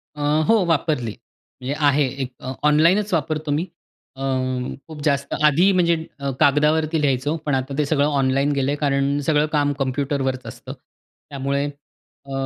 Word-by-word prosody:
अ, 150 - -7 0.3
हो, 225 -3 +4
वापरली. 150 -8 0 0.5
म्हणजे 130 +3 -2
आहे 140 0 +3
एक 130 -1 -3
अ, 130 - -6 0.2
ऑनलाईनच 175 +7 +3
वापरतो 155 -1 -1
मी. 150 +3 +1 0.5
अ, 135 - -10 0.7
खूप 155 -2 -9
जास्त 140 -2 0
आधी 160 +6 +5
म्हणजे 170 -2 +3 0.2
अ, 140 0 -2
कागदावरती 155 +2 +3
लिहायचो. 140 +1 0
पण 145 -2 +1
आता 135 +1 -3
ते 150 - +2
सगळं 145 -1 +2
ऑनलाईन 135 0 +1
गेलं 140 -1 0
आहे 145 - -2
कारण 140 -1 +1
सगळं 150 -1 +3
काम 145 0 +1
कम्प्युटरवरच 135 -1 -1
असतं. - - -8 0.6
त्यामुळे 140 0 -1
अ, 140 -1 -13
145 Hz, 155 wpm, -22 LUFS, 140-155 Hz, 0.7 s, आधी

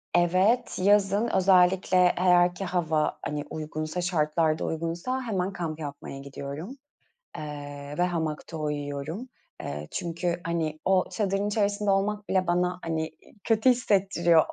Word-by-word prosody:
Evet, 185 +7 +2
yazın 205 +2 +3
özellikle, 185 0 +4
eee, 180 -1 +5
eğer 180 -1 +4
ki 195 - -4
hava, 165 -4 0
hani, 145 0 -2
uygunsa, 155 +2 -4
şartlar 160 -2 +1
da - - -2
uygunsa 170 +11 -2
hemen 195 -6 -2
kamp 165 -4 -4
yapmaya 140 -2 -7
gidiyorum, 140 - -7 0.6
ııı, 145 -1 -7
ve 175 - +3
hamakta 160 -2 -2
uyuyorum. 150 - -4 0.6
Çünkü, 170 0 -2
hani, 160 -2 -2
o 190 -1 +4
çadırın 200 -1 0
içerisinde 205 0 0
olmak 205 +1 0
bile 185 -1 +1
bana, 180 +1 +1
hani 160 -1 -2 0.3
kötü 225 +3 +3
hissettiriyor. 190 -8 +3
175 Hz, 130 wpm, -27 LUFS, 155-195 Hz, 0.6 s, eee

